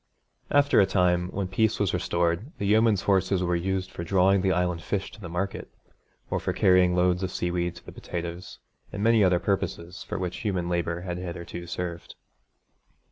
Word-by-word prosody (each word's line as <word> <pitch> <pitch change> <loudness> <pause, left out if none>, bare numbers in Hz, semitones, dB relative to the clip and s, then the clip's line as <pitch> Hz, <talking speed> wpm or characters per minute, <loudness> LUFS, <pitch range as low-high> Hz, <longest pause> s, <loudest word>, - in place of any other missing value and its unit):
After 145 -5 +4
a 95 - +3
time, 90 -1 +2
when 95 0 -3
peace 110 +3 +1
was 100 -4 +1
restored, 85 - 0
the 100 - -3
yeomen's 110 -2 +3
horses 95 -1 +2
were 90 0 +1
used 95 +1 -2
for 85 - -6
drawing 95 +2 +3
the 95 0 +2
Island 90 -2 0
fish 100 +4 -3
to 110 - -14
the 90 - -7
market, 90 +3 -3 0.6
or - - +1
for - - -2
carrying 90 -1 +4
loads 90 0 +2
of 95 - -1
seaweed 90 0 -2
to - - -14
the - - -9
potatoes, 85 0 -6 0.3
and 105 0 -4
many 115 -1 +5
other 90 -2 +4
purposes 90 -2 -2
for - - -5
which 90 -2 -3
human 95 -5 -2
labour 85 -1 -1
had 90 -1 -4
hitherto 85 -1 -6
served. 85 0 -5
90 Hz, 185 wpm, -26 LUFS, 85-95 Hz, 0.6 s, many